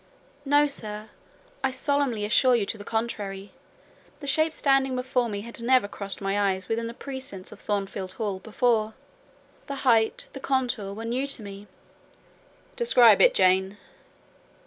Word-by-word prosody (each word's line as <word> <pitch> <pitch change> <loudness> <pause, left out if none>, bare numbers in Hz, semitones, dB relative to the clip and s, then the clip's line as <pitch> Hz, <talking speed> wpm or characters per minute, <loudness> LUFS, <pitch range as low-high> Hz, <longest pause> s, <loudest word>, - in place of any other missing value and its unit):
"No, 290 +1 +4
sir, 215 -6 -4 0.5
I 265 - +3
solemnly 260 -4 0
assure 245 +4 +4
you 220 -4 +1
to 220 - -4
the - - -7
contrary. 205 -4 -4 0.7
The 290 - -9
shape 315 +3 +2
standing 270 -3 +2
before 250 -1 0
me 200 -1 -4
had 235 +2 -8
never 250 -2 +3
crossed 200 -1 -4
my 195 +1 0
eyes 190 +1 -7
within 230 +1 -2
the 230 - -7
precincts 260 -10 -7
of - - -12
Thornfield 195 -2 -3
Hall 205 -4 -3
before; 220 0 0 0.7
the 280 - -4
height, 225 -3 +3
the 270 - -7
contour 250 -7 -1
were 225 +2 -6
new 250 +4 -1
to 270 -5 -3
me." 200 0 -9 1.1
"Describe 245 - +5
it, - - +6
Jane." 190 +2 +3
230 Hz, 150 wpm, -26 LUFS, 205-260 Hz, 1.1 s, it